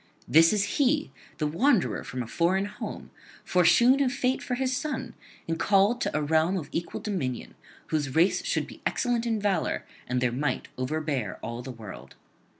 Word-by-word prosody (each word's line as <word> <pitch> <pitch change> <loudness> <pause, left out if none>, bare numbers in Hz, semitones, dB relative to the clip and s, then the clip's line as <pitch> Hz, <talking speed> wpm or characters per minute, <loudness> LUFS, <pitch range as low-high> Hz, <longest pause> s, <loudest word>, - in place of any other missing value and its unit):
This 165 +2 +6
is 210 -2 +2 0.2
he, 290 +2 +2 0.3
the 155 - -1
wanderer 220 - +2
from 125 0 -4
a - - -9
foreign 180 - +1
home, 205 - -7 0.3
foreshewn 235 +10 +5
of 255 - +1
fate 255 +1 0
for 250 - -2
his 255 0 0
son, 270 -4 -3 0.3
and 165 0 -2
called 205 +6 +3
to - - 0
a 150 - 0
realm 160 +5 +2
of 155 -5 -5
equal 170 +1 -4
dominion, 140 - -3 0.4
whose 145 -4 -1
race 170 +4 +3
should - - 0
be - - -13
excellent 240 -2 0
in 225 -2 0
valour 200 -5 0 0.2
and 125 0 0
their 125 -1 +1
might 140 +5 -2
overbear 135 - -2
all 115 +1 -4
the 130 - -8
world. 110 -6 -10
175 Hz, 175 wpm, -27 LUFS, 145-240 Hz, 0.4 s, This